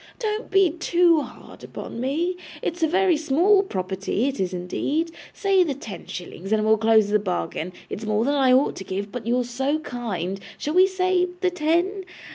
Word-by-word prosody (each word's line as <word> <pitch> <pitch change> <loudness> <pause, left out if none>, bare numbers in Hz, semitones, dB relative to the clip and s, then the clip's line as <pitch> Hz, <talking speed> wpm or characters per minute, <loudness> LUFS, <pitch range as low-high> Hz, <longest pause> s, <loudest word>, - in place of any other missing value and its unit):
'Don't 435 -1 -3
be 390 -4 +4
too 340 -1 +3
hard - - -11
upon - - -7
me. 325 +8 0 0.3
It's 345 +1 -3
a 320 - +4
very 370 +1 +3
small 330 +7 +3
property, 195 - -2
it 275 - -3
is 190 -1 0
indeed. 275 - -2 0.2
Say 390 -2 +3
the 295 -6 -2
ten 220 -7 -9
shillings, 180 +2 -7
and 215 -1 +2
we'll 220 0 +4
close 220 -2 +4
the 210 0 +3
bargain. 180 -3 -3 0.2
It's 215 - -6
more 215 +1 +1
than 285 - +1
I 270 -3 +3
ought 260 +2 +3
to - - -6
give, 200 +2 -4
but 235 -1 -6
you're 245 +1 +2
so 265 +5 -1
kind 195 - -4 0.2
shall 300 - -3
we 370 +2 +6
say 370 -1 +1
the 365 -1 +2
ten? 355 +4 0
275 Hz, 190 wpm, -24 LUFS, 215-355 Hz, 0.3 s, we